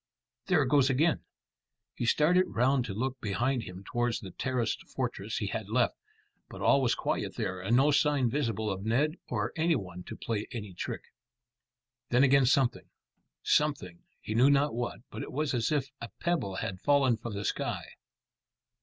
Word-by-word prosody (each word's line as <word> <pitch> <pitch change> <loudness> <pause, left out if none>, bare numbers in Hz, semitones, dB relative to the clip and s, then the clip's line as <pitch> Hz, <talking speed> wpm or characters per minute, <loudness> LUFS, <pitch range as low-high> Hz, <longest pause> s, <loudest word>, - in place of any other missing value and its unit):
There 175 -6 +4
it - - -1
goes 140 -1 +4
again." 155 +6 +2 0.7
He 120 - -3
started 175 +8 +4
round 130 -1 +2
to 105 - -4
look 130 +3 -3
behind 120 +5 0
him 90 +1 -9
towards 120 +2 -1
the 95 -3 -9
terraced 125 +1 -2
fortress - - -3
he - - -1
had - - -4
left, - - +2 0.6
but - - -9
all 140 - +4
was 125 -3 +2
quiet - - -2
there 95 0 -3
and 110 +6 +2
no 140 +3 +5
sign 145 -3 +3
visible 115 -5 -1
of 95 0 -4
Ned 140 - +1
or - - -2
any 165 0 +2
one 90 -6 -5
to - - -7
play 110 -2 -3
any 105 -6 -6
trick. 85 - -4 1.1
Then 125 +3 +4
again 140 -1 +5
something 135 -1 +2 0.5
something, 135 - +1 0.2
he 110 - -5
knew 125 +5 +5
not 145 0 +3
what; 120 0 -3
but - - -6
it - - -6
was 150 0 -1
as 120 +1 0
if 140 -2 0
a 115 - -6
pebble 170 - -1
had 95 0 -4
fallen 140 -4 +4
from 110 -1 -6
the 100 - -4
sky. - - -2
125 Hz, 180 wpm, -30 LUFS, 110-145 Hz, 1.1 s, no